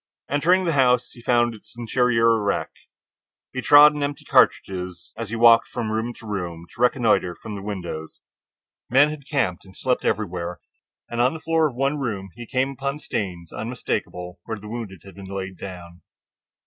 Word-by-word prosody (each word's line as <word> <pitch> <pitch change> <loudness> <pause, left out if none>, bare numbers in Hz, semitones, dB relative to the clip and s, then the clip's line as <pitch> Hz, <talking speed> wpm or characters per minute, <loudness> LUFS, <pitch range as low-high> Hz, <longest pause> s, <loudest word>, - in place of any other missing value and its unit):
Entering 175 +7 +3
the 165 - +1
house, 125 -3 +3
he 120 - -14
found 120 0 +2
the 110 - -12 0.2
interior 115 -1 +3
a - - 0
wreck. 100 -1 -1 0.8
He 130 - -2
trod 145 +2 +8
on 150 - -3
empty 145 0 -3
cartridges 90 -2 +1
as 115 -3 -5
he 115 - -3
walked 115 0 +6
from 115 -3 -3
room 110 +2 -1
to - - -14
room 90 -5 -4
to - - -9
reconnoiter 115 -8 +3
from 110 - -8
the 100 - -6
windows. 90 -6 -6 0.7
Men 145 +4 +5
had 145 -3 -9
camped 120 - 0
and 95 -1 -16
slept 125 -1 0
everywhere, 90 -4 -2 0.5
and 120 0 -1
on 130 +5 +3
the - - -6
floor 160 -1 +2
of 125 - -12
one 135 +3 0
room 100 -8 -3
he 120 0 -9
came 130 +3 0
upon 140 +1 -3
stains 90 - -4
unmistakable 90 -6 -4
where 110 -1 -4
the 105 - -10
wounded 105 -5 -6
had 95 - -12
been 100 - -10
laid 95 -1 -5
down. 90 -2 -9
115 Hz, 185 wpm, -23 LUFS, 95-130 Hz, 0.8 s, trod